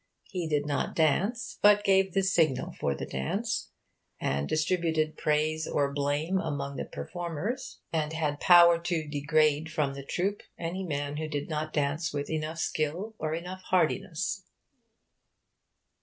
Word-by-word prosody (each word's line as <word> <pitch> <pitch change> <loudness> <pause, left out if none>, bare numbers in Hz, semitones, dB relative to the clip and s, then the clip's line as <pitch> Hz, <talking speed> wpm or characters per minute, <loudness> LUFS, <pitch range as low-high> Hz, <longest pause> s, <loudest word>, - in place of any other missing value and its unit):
He 180 -4 -2
did 145 -2 +1
not 145 -1 -1
dance, 195 - +1
but 205 0 +6
gave 190 -2 +3
the 195 - +3
signal 165 -7 +2
for 70 - 0
the - - -5
dance, 65 0 -2 0.5
and 70 +1 -1
distributed 155 -1 +1
praise 155 +1 0
or 140 -1 0
blame 145 +6 0
among 140 -4 -3
the - - -3
performers, 175 - -5
and 155 -1 0
had 150 -2 -1
power 170 -1 +7
to 170 -2 -2
degrade 150 +1 +2
from 150 -3 0
the 140 0 -7
troupe 190 +8 -1 0.2
any 175 +3 -3
man 145 -3 -3
who 155 0 -2
did 145 0 -3
not 155 0 -2
dance 150 +2 0
with 145 +1 -3
enough 155 +1 -2
skill 165 +7 -2
or 155 0 -1
enough 180 +3 -6
heartiness. 185 +2 0
155 Hz, 145 wpm, -29 LUFS, 145-175 Hz, 0.5 s, power